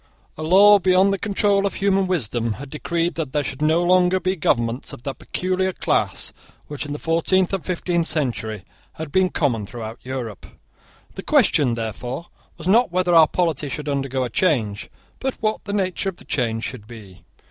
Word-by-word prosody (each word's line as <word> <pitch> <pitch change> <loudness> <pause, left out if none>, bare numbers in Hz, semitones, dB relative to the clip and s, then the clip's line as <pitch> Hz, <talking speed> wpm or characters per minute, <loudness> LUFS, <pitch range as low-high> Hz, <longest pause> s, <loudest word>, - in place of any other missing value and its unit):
A - - -8
law, 200 +6 +7
beyond 185 +1 +4
the 195 - -2
control 200 -1 +1
of - - -5
human 195 -1 +1
wisdom, 120 - -1
had 135 +4 -10
decreed 170 +3 -1
that 155 -6 -4
there 150 -1 +1
should 130 +1 -6
no 160 +3 +3
longer 180 +1 +3
be 185 +1 -1
governments 120 -6 -1
of 120 - -11
that 135 - -5
peculiar 185 +1 -1
class - - 0 0.3
which, 145 0 -6
in 145 - -4
the - - -4
fourteenth 170 +4 +1
and 195 - -1
fifteenth 175 -2 -1
centuries, 115 - -2 0.3
had 155 -2 -7
been 185 +3 +3
common 120 - 0
throughout 115 0 -7
Europe. 125 -6 -6 0.7
The - - -7
question, 125 -5 +3
therefore, 120 - -5 0.3
was 170 0 -7
not 225 +1 +4
whether 180 0 +1
our 160 -2 +7
polity 160 -5 -1
should 150 +3 -5
undergo 135 -2 -1
a 125 - -4
change, 110 - 0 0.3
but 265 -1 -2
what 215 -1 -1
the 200 - -4
nature 195 -1 -1
of 190 - -8
the - - -16
change 115 -3 -1
should 110 -5 -6
be. 100 -6 -12
155 Hz, 185 wpm, -22 LUFS, 125-185 Hz, 0.7 s, law